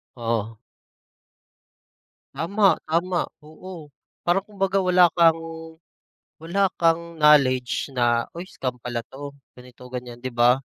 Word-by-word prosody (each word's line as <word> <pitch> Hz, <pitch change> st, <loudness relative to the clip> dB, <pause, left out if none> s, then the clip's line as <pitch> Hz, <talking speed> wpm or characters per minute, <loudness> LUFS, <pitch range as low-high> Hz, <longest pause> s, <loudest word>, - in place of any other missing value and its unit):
Oo. 115 Hz, -2 st, -2 dB, 1.8 s
Tama, 195 Hz, +4 st, +2 dB
tama 175 Hz, +2 st, +1 dB, 0.2 s
oo. 155 Hz, -1 st, -11 dB, 0.3 s
Parang 175 Hz, +3 st, +2 dB
kumbaga 195 Hz, -1 st, -1 dB
wala 180 Hz, -1 st, +5 dB
kang, 165 Hz, -1 st, +5 dB, 1.0 s
wala 190 Hz, +5 st, 0 dB
kang 170 Hz, 0 st, +1 dB
knowledge 140 Hz, -5 st, +3 dB
na, 120 Hz, -3 st, +1 dB
"Uy, 170 Hz, +2 st, -8 dB
scam 130 Hz, -8 st, -5 dB
pala 120 Hz, -1 st, -4 dB
'to," 140 Hz, +1 st, -8 dB, 0.2 s
ganito, 125 Hz, -1 st, -16 dB
gan'yan 125 Hz, -1 st, -7 dB
di 130 Hz, -, -3 dB
ba? 120 Hz, +2 st, +3 dB
150 Hz, 110 wpm, -23 LUFS, 125-175 Hz, 1.8 s, wala